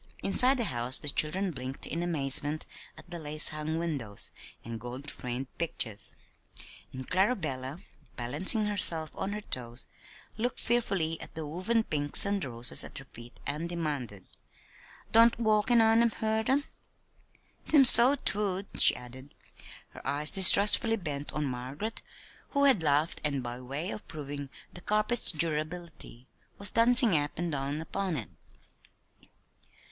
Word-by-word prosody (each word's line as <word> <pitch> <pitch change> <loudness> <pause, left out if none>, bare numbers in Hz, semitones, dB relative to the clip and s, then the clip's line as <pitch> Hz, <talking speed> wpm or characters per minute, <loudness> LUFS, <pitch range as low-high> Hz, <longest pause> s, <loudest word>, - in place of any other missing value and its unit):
Inside 255 +7 +4
the 240 - +1
house 125 - -2
the 150 - -1
children 180 +7 0
blinked 130 -2 -4
in 170 - -6
amazement 150 -2 +2 0.3
at - - -15
the 170 - -7
lace 155 0 +2
hung 155 +1 -6
windows, 140 -12 -3 0.3
and 115 -1 -8
gold 125 +4 -9
framed 125 +1 -7
pictures; 115 -10 -5 0.8
and 130 0 -10
Clarabella, 175 - -3 0.3
balancing 155 - 0
herself 165 -6 +1
on 195 - -6
her 210 +1 -7
toes, 120 - -5 0.5
looked 240 +2 -4
fearfully 195 -9 -2
at - - -12
the 160 -1 -7
woven 185 +9 -3
pinks 145 -3 +4
and 200 -1 -3
roses 120 -2 0
at - - -12
her 135 - -12
feet 120 +1 -13
and 150 +4 -6
demanded: 145 - -6 0.9
"Don't 230 +1 +4
walkin' 220 +1 +1
on 225 +1 +3
'em 235 - +2
hurt 220 +1 -4
'em? 280 +2 0 1.0
"Seems 275 -5 +10
so 245 +4 +9
'twould," 200 -6 0 0.2
she - - +5
added, 130 +3 -13 0.5
her - - -15
eyes 150 +2 -1
distrustfully 205 +4 +5
bent 145 -6 -7
on 150 -1 -4
Margaret 135 - -7 0.5
who 280 -1 0
had 265 -10 +4
laughed, 150 +1 -1
and 140 -3 -3
by 120 0 -8
way 140 +8 -7
of 215 - -10
proving 145 -2 -9 0.2
the 175 - -13
carpet's 215 +4 0
durability, 155 -4 -4 0.3
was 200 - +3
dancing 235 -3 +5
up 145 -1 -3
and 170 0 -4
down 140 +1 -5
upon 180 +1 -5
it. 110 - -8
160 Hz, 145 wpm, -27 LUFS, 135-210 Hz, 1.0 s, Seems